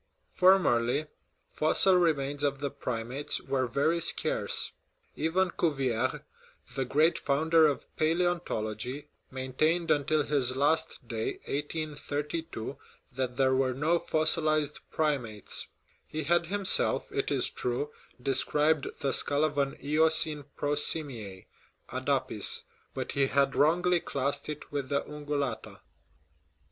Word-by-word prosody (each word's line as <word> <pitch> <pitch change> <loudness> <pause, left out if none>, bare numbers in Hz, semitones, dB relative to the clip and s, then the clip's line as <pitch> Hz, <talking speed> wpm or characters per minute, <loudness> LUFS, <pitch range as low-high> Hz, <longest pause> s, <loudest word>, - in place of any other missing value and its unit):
Formerly 150 -8 +3 0.5
fossil 160 +5 +4
remains 145 -5 +1
of 140 -1 0
the 140 -1 -3
primates 125 +1 -3
were 130 -2 -1
very 150 +7 +1
scarce. - - 0 0.4
Even 180 +4 +1
Cuvier, 130 -8 -1 0.5
the 135 - -1
great 155 +6 +2
founder 160 +3 +3
of 145 - -2
palaeontology, 150 -7 -1 0.2
maintained 145 +6 0
until 150 +1 +2
his 135 -4 +1
last 145 -2 0
day 115 -1 -2
(1832) 150 -2 -4 0.3
that 125 -1 -3
there 130 -1 +3
were 130 -1 +1
no 160 +5 +1
fossilized 155 -2 +1
primates; 130 -10 -1 0.4
he 155 0 -4
had 170 +3 +2
himself, 200 +1 +3
it - - -1
is - - 0
true, 125 +4 -2 0.3
described 145 +3 +1
the 135 - +1
skull 145 +1 +3
of 150 -2 0
an 140 -1 -1
Eocene 155 0 +3
prosimias 140 -9 -1 0.5
(adapis), - - 0 0.3
but - - -3
he 140 -1 +2
had 140 0 +1
wrongly 175 +4 +3
classed 140 -1 -3
it 150 -1 -7
with 140 -3 -3
the 140 - 0
ungulata. 145 -4 -4
145 Hz, 115 wpm, -29 LUFS, 135-160 Hz, 0.5 s, fossil